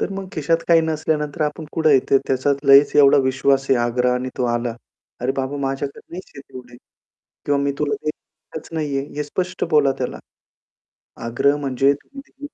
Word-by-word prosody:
तर - - -2
मग 195 -1 -6
खिशात 160 +1 +1
काही 165 -1 +6
नसल्यानंतर 155 -1 -2
आपण 150 +1 -3
कुठे 160 -1 +2
येतोय? 135 0 +3
त्याचा 135 +2 +1 0.2
लयच 140 +1 +7
एवढा 140 -1 +6
विश्वास 135 +1 +1
आहे, - - +6
आग्रहाने 125 +1 0
तो 125 - -1
आला. 120 -1 -2 0.5
अरे 125 +2 0
बाबा! 135 +1 -2
माझ्याकडे 135 0 -3
नाहीच 180 +2 -9
आहे 140 - -9
तेवढे, 125 -3 -13 0.7
किंवा 145 -1 +1
मी 140 0 0
तुला 145 -1 0
देतच 155 +1 -8
नाहीये, 145 -4 -2
हे 150 - -1
स्पष्ट 180 +5 -3
बोला 140 -3 +4
त्याला. 125 - -4 1.1
आग्रह 140 +5 +1
म्हणजे, 135 -1 +1
तुम्ही 275 +1 -12
140 Hz, 165 wpm, -20 LUFS, 135-155 Hz, 1.1 s, लयच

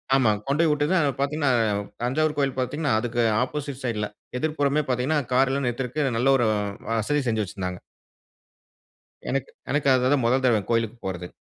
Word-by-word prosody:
ஆமா 120 -5 +4 0.2
கொண்டோய் 155 +3 +2
விட்டதும் 150 +5 +1
அங்க 145 - +2
பாத்தீங்கனா 145 0 0 0.5
தஞ்சாவூர் 150 +5 +1
கோயில் 135 -2 0
பாத்தீங்கன்னா 145 +3 -1
அதுக்கு 120 0 -1 0.2
ஆப்போசைட் 140 0 -4
சைட்ல 105 -4 -1 0.3
எதிர்ப்புறமே 150 -1 +1
பாத்தீங்கன்னா 130 +5 +1
கார் 135 +1 +4
எல்லாம் 140 -1 -1
நிறுத்துறக்கு 130 +4 -1
நல்ல 135 +2 +3
ஒரு 120 -3 +2
அ 105 +2 -3
வசதி 145 +7 0
செஞ்சு 110 -1 0
வச்சிருந்தாங்க. 90 -1 -5 1.5
எனக்கு 135 +1 -1 0.2
எனக்கு 145 -1 +1
அது 130 0 +2
தான் 130 -5 +1
மொதல் 130 +3 +2
தடவை 115 -4 +3
கோயிலுக்கு 115 0 0
போறது. 90 -2 -4
130 Hz, 160 wpm, -25 LUFS, 115-145 Hz, 1.5 s, ஆமா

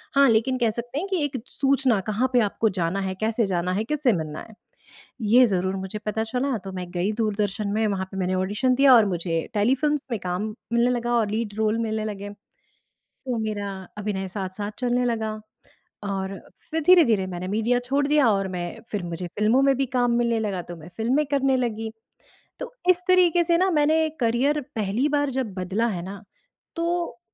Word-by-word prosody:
हाँ, 280 0 +6
लेकिन 235 +3 +2
कह 235 -3 +2
सकते 240 +5 -5
हैं 385 - -3
कि 360 -6 0
एक 275 -2 -2
सूचना 270 -5 +2
कहाँ 245 +5 +1
पे 245 - +5
आपको 215 +1 +1
जाना 170 +4 0
है, 190 -1 -3
कैसे 220 0 +1
जाना 180 -1 -1
है, 210 +3 0
किससे 285 0 +1
मिलना 155 -4 -4
है - - -14 0.7
ये 240 +4 +6
ज़रूर 190 -1 -1
मुझे 190 +2 -5
पता 220 +1 -1
चला। 250 +2 -1
तो 195 - -5
मैं 180 -1 -5
गई 180 +3 0
दूरदर्शन 210 -2 -1
में 220 +1 +1
वहाँ 195 -2 -1
पे - - -8
मैंने 185 0 0
ऑडिशन 210 +7 +1
दिया 270 0 +6
और 225 - +7
मुझे 170 -3 -2
टेलीफिल्म्स 270 +7 +1
में 230 - -1
काम 180 +2 -2 0.3
मिलने 235 +1 +3
लगा 240 -1 -1
और 220 -3 +1
लीड 215 -1 -2
रोल 220 +1 +1
मिलने 220 -1 -1
लगे। 205 -1 -5 0.8
तो 250 -3 -6
मेरा 210 -2 -3 0.3
अभिनय 195 -2 -3
साथ-साथ 195 +2 -4
चलने 245 0 +1
लगा 220 -3 -1 0.7
और 195 -1 -3 0.3
फिर 320 0 -1
धीरे-धीरे 240 - +5
मैंने 185 0 -5
मीडिया 225 +4 +1
छोड़ 280 +2 +1
दिया 290 -4 +4
और 195 -1 0
मैं 180 -1 -3 0.2
फिर 205 -3 -2
मुझे 175 +1 -5
फिल्मों 225 +6 +4
में 275 0 +4
भी 270 +1 0
काम 245 -1 +1
मिलने 235 -1 +1
लगा, 195 -5 -2
तो 175 0 -9
मैं 160 0 -12
फिल्में 255 +7 +1
करने 270 -1 +2
लगी। 225 -3 -2 0.7
तो - - -6 0.2
इस 360 0 0
तरीके 355 -2 +5
से 335 0 +2
ना 375 +1 +3
मैंने 315 +1 +3
करियर 265 +6 +2
पहली 220 +6 0
बार 290 -1 +1
जब 225 -7 -3
बदला 190 +6 -1
है 185 -6 -3
ना, 200 +2 -8 0.5
तो 335 -7 -2
225 Hz, 195 wpm, -24 LUFS, 195-265 Hz, 0.8 s, और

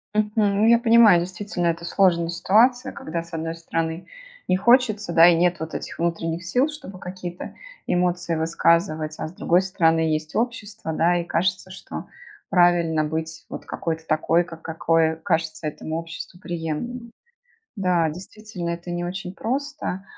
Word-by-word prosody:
Мгм. 210 0 +2
Я 235 - +7
понимаю, 225 -7 +6
действительно, 180 -1 -3
это 170 0 -1
сложная 170 -3 +2
ситуация, 220 +8 +3
когда 165 +1 -5
с 170 - -18
одной 165 0 -3
стороны 165 0 -3 0.4
не 185 - +3
хочется, 215 -4 +3
да 165 0 +7
и 175 - +6
нет 175 0 +2
вот 160 0 -6
этих - - -6
внутренних 165 0 -2
сил, 250 - +2
чтобы 205 -11 -9
какие-то 180 -1 -7 0.3
эмоции 175 -1 0
высказывать, 160 -1 +1
а - - -4
с 160 - -11
другой 180 0 +2
стороны 165 -4 +2
есть 155 -1 -1
общество, 215 -7 -3
да, 175 +2 +2
и 170 - -2
кажется, 185 +2 -1
что 190 - -8 0.4
правильно 175 -3 +3
быть 160 +1 -4
вот - - -7
какой-то 160 -1 -4
такой, 160 +2 +2
ка 165 -2 -10
какой 165 0 +1
кажется 160 -3 -1
этому 155 +1 -4
обществу 165 +2 -8
приемлемым. 175 +9 -5 0.6
Да, 180 -5 +2
действительно, 185 +1 -7
это 170 +1 -6
не 175 0 -2
очень 180 0 -5
просто. 265 -4 -3
175 Hz, 150 wpm, -23 LUFS, 165-195 Hz, 0.6 s, Я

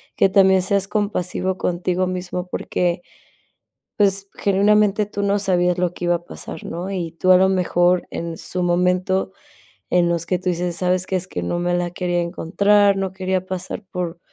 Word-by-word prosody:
que 195 - +4
también 190 -1 +5
seas 195 +1 0
compasivo 190 -3 -2
contigo 180 +1 -1
mismo 180 0 -4
porque, 175 -1 -1 1.0
pues, 195 -1 +2
genuinamente 205 +1 +3
tú 205 -1 -4
no 200 0 +1
sabías 180 -2 +1
lo 180 -1 0
que 175 - -4
iba 175 0 +3
a 170 - -6
pasar, 160 - -8
¿no?, 175 +3 -5
y 175 -4 -4
tú 185 +2 +2
a 180 - +8
lo 190 - +4
mejor, 180 -1 +2
en 165 -1 -5
su 180 - -4
momento, 180 +2 +1 0.6
en 175 -1 +3
los 170 -1 -1
que 180 - +1
tú 185 +1 -2
dices: 175 0 -2
"¿Sabes 180 +1 0
qué?, 190 - -1
es 185 0 -2
que 90 - -4
no 85 - -2
me 175 0 0
la 175 0 0
quería 175 0 -1
encontrar, 200 +4 +2
no 190 -1 -2
quería 185 -1 -2
pasar 185 +3 -5
por 175 -2 -4
180 Hz, 185 wpm, -21 LUFS, 175-190 Hz, 1.0 s, a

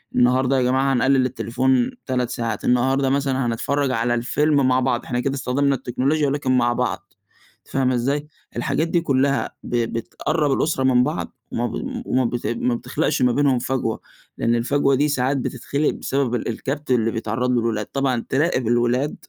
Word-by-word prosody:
النهارده 130 +2 +3
يا - - +2
جماعة 130 +2 +2
هنقلل 130 +1 +3
التليفون 125 +1 0
3 125 -2 -1
ساعات، 115 -4 -3
النهارده 130 +2 +2
مثلًا 135 -2 0
هنتفرّج 135 +4 0
على 120 0 0
الفيلم 140 +3 +2
مع 130 0 +3
بعض، 125 -1 0
إحنا 120 0 -2
كده 135 +2 -1
استخدمنا 140 +1 +1
التكنولوجيا 135 +5 0
ولكن 135 -2 +1
مع 120 -1 +2
بعض، - - -3 0.5
أنتِ - - -26
فاهمة 130 -2 +2
إزاي؟ 140 +5 -1 0.3
الحاجات 155 +6 0
دي 170 0 +1
كلّها 140 -3 +1
ب - - -4 0.2
بتقرّب 150 +6 -1
الأسرة 135 -1 0
من 125 -1 +4
بعض، - - -4
وما - - -1
ب - - -5
وما 130 0 +1
بت 120 -2 -2
ما 120 +1 0
بتخلقش 140 +5 -1
ما 125 -1 +4
بينهم 135 -2 +2
فجوة، 125 -3 -2 0.4
لإن 115 0 +1
الفجوة 140 +3 +2
دي 145 +3 +2
ساعات 135 -1 0
بتتخلق 140 +3 -1
بسبب 135 -3 -1
ال - - -3
الكبت 135 +4 -4
اللي 115 -2 +2
بيتعرّض 115 +3 -1
له 125 - +2
الولاد، 110 -2 -1
طبعًا 135 -4 -1
تراقب 135 -4 +1
الولاد 120 +4 +1
130 Hz, 175 wpm, -22 LUFS, 120-140 Hz, 0.5 s, من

